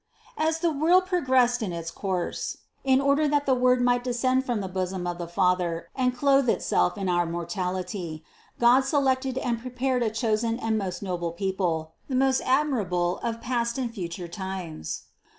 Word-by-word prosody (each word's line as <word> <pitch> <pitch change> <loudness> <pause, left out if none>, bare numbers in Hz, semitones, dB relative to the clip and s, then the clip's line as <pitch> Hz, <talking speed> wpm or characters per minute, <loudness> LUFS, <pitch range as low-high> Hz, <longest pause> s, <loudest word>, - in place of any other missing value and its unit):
145. 310 +1 +2
As 320 0 -2
the 325 -5 0
world 365 +3 +5
progressed 260 -9 +2
in 205 -5 -2
its 165 -1 -5
course, 185 -3 -3 0.3
in 265 -1 +4
order 280 +2 +3
that 290 0 +1
the 270 - +3
Word 250 0 +3
might 245 0 +2
descend 255 +1 +1
from 245 -4 -1
the 195 - -3
bosom 185 0 -3
of 175 0 -3
the 170 - -4
Father 175 -1 0
and 250 -1 0
clothe 275 -1 +4
Itself 90 - +1
in 195 -1 -2
our 175 -1 +2
mortality, 175 -1 -4 0.4
God 240 +2 +6
selected 265 -1 +1
and 235 -3 -1
prepared 255 +1 -1
a 230 - +2
chosen 225 +1 0
and 225 -2 -1
most 190 -3 -3
noble 175 -3 -2
people, 170 -4 -2 0.2
the 260 - -1
most 265 0 +3
admirable 210 -11 +1
of 230 0 -3
past 235 -1 -1
and 245 -3 -2
future 175 -3 -5
times. 180 - -5
230 Hz, 175 wpm, -26 LUFS, 180-260 Hz, 0.4 s, God